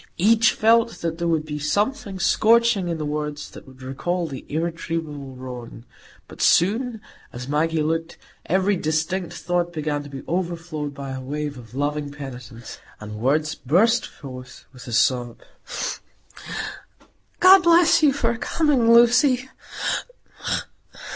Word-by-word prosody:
Each 225 +5 +4
felt 230 +1 +3
that 165 0 -3
there 170 - 0
would 160 -2 +1
be 150 -1 -5
something 200 - -1
scorching 220 +1 +3
in 170 -1 -2
the 155 - -3
words 150 0 -4
that - - -13
would 130 0 -14
recall 170 +7 -2
the 135 -5 -8
irretrievable 160 -4 -4
wrong. 125 -2 -9 0.4
But - - -10
soon, 220 +5 +2 0.3
as 125 +1 -7
Maggie 155 +2 +1
looked, 165 +1 -2 0.3
every 190 +3 +2
distinct 160 +3 -1
thought 175 0 -1
began 150 -3 -2
to 145 - -10
be 135 -1 -8
overflowed 170 -4 -3
by 140 -1 -6
a 130 0 -5
wave 145 +2 -4
of 120 -1 -12
loving 145 +1 -1
penitence, 125 -5 -9 0.2
and 105 0 -8
words 150 +6 +1
burst 220 - +2
forth 130 -2 -11
with 125 -1 -12
a - - -6
sob. 120 0 +1 2.0
"God 375 +1 +8
bless 340 -1 +5
you 300 -2 +5
for 235 -4 0
coming, 275 -8 +2
Lucy." 245 +2 +5
160 Hz, 135 wpm, -23 LUFS, 140-205 Hz, 2.0 s, God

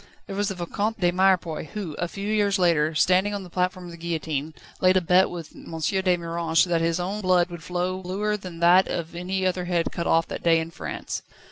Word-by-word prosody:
There 195 - -6
was 205 +1 0
the 195 - -3
Vicomte 200 +5 -2
de 175 -2 +3
Mirepoix, 180 -3 +2
who, 190 -2 -6
a 175 - 0
few 200 +3 -6
years 205 -2 +2
later, 165 -4 +2
standing 185 +6 +3
on 200 - -4
the 180 - -12
platform 180 0 -1
of 175 - -8
the 170 - -10
guillotine, 160 -3 -3 0.2
laid 185 0 +4
a - - +6
bet 180 +2 +4
with 170 -3 -8
M. 165 - -8
de 185 +2 +1
Miranges 170 0 +1
that 170 -2 0
his 165 +1 +1
own 195 +4 -3
blood 180 -2 +3
would 170 -2 -7
flow 180 +2 -2
bluer 200 +4 -1
than 185 -4 -8
that 180 +2 +6
of 170 -1 -4
any 185 +2 -2
other 180 -1 0
head 175 -2 0
cut 170 - -3
off 165 0 +3
that - - -5
day 165 -1 +4
in 160 +1 -5
France. - - -5
180 Hz, 230 wpm, -25 LUFS, 170-190 Hz, 0.2 s, a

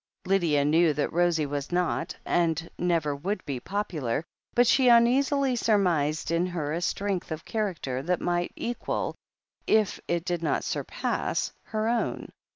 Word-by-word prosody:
Lydia 170 -7 +2
knew 160 +1 +4
that 145 0 -2
Rosie 170 -2 +2
was 145 +1 -4
not, 175 0 0
and 165 -1 +1
never 165 -5 0
would 190 +9 -3
be, 135 -3 -3
popular, 155 - -2 0.3
but 245 - +5
she 260 +2 +4
uneasily 260 +3 +4
surmised 175 -10 +1
in 170 +2 +1
her 155 -5 -3
a 170 - -2
strength 195 -1 -2
of 160 0 -5
character 180 - -2
that 175 +5 0
might 175 0 -1
equal, 240 +1 -3 0.5
if 215 -3 +2
it 170 0 -1
did 175 -1 -1
not 165 - 0
surpass, - - -2
her 215 0 -2
own. 235 0 -1
175 Hz, 150 wpm, -27 LUFS, 155-210 Hz, 0.5 s, but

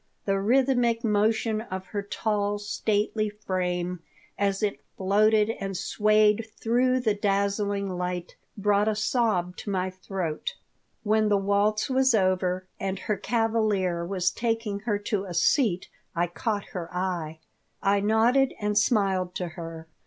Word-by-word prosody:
The 195 -1 +1
rhythmic 240 +1 +2
motion 220 0 +1
of 190 -4 -6
her 205 +1 -2
tall, 205 0 -1
stately 210 +1 -1
frame, 180 -3 -2 0.4
as 200 0 0
it 205 - 0 0.2
floated 210 +3 +3
and 195 -1 -3
swayed 215 +3 +3
through 255 +3 +2
the 220 -4 +2
dazzling 200 0 0
light, 180 -1 -4 0.2
brought 205 +1 +2
a 215 - +1
sob 215 -5 0
to - - -6
my 185 -1 -1
throat 185 -4 -4 0.5
When 215 0 +2
the 205 - +4
waltz 205 +2 +1
was 265 -2 +3
over 185 -2 +1
and 195 0 -2
her 210 - -2
cavalier 210 -5 0
was 180 0 0
taking 225 -3 -2
her 205 - +2
to 205 -1 -2
a 180 -3 -6
seat 185 - +2 0.3
I 170 +1 +2
caught 205 +4 -3
her 175 -3 -5
eye. 180 -4 -3 0.5
I 200 +1 +3
nodded 230 +6 +3
and 210 0 -1
smiled 195 -5 +1
to 180 -2 -3
her. 165 -1 -8
205 Hz, 140 wpm, -26 LUFS, 185-220 Hz, 0.5 s, the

